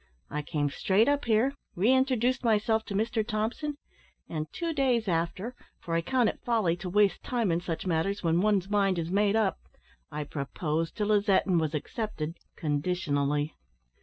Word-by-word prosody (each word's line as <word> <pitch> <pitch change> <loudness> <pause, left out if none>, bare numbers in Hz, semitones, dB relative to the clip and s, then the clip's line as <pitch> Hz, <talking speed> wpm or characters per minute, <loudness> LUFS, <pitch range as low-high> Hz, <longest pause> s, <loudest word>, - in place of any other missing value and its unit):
I 150 - -2
came 145 -2 -1
straight 200 +9 +2
up 285 -1 +1
here, 235 +4 +3 0.2
re 210 +9 +4
introduced 255 -1 +2
myself 220 -1 +2
to 200 - -5
Mr 220 +2 +1
Thompson; 235 +7 -2 0.5
and, 155 -2 -4
two 335 -1 -2
days 255 -6 +1
after 175 +7 -1 0.3
for 165 - -5
I 165 - +2
count 245 +6 +2
it - - -2
folly 220 -8 +2
to 180 +1 -5
waste 205 +1 +3
time 235 -7 0
in 165 +1 +1
such 170 -1 -4
matters 185 +4 0
when 165 +1 +2
one's 200 -3 +2
mind 200 -2 +2
is 165 0 -2
made 205 +1 +3
up 215 -4 +1 0.5
I 150 0 -3
proposed 155 +4 -3
to 210 - 0
Lizette, 205 -1 +3
and 180 -3 +3
was 155 -1 -1
accepted 165 -1 -4 0.2
conditionally. 145 -2 0
195 Hz, 170 wpm, -29 LUFS, 165-225 Hz, 0.5 s, re